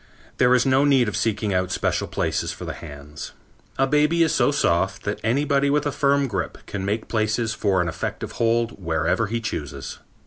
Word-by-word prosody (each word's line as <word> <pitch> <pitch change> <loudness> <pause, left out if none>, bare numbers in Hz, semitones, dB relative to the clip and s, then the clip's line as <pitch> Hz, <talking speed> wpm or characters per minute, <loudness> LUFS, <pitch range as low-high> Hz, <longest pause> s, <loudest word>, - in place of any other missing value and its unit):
There 125 0 +5
is 125 - +3
no 135 +1 +4
need 135 -5 +4
of 105 - -2
seeking 105 +1 0
out 90 0 0
special - - -1
places - - -1
for - - -8
the - - -4
hands. 75 +1 -9 0.4
A 135 - +3
baby 150 +4 +3
is 160 - +1
so - - +3
soft 95 -9 +1
that 100 - -3
anybody 140 +4 +2
with 145 +1 +1
a 145 - 0
firm 140 +1 +2
grip 110 -8 -3
can 95 - -5
make 105 +3 -2
places 110 0 0
for 100 -3 +1
an 90 - -1
effective 85 - -4
hold 115 -3 +1
wherever 85 +7 0
he 115 +3 -2
chooses. 75 - -5
115 Hz, 195 wpm, -23 LUFS, 95-135 Hz, 0.4 s, There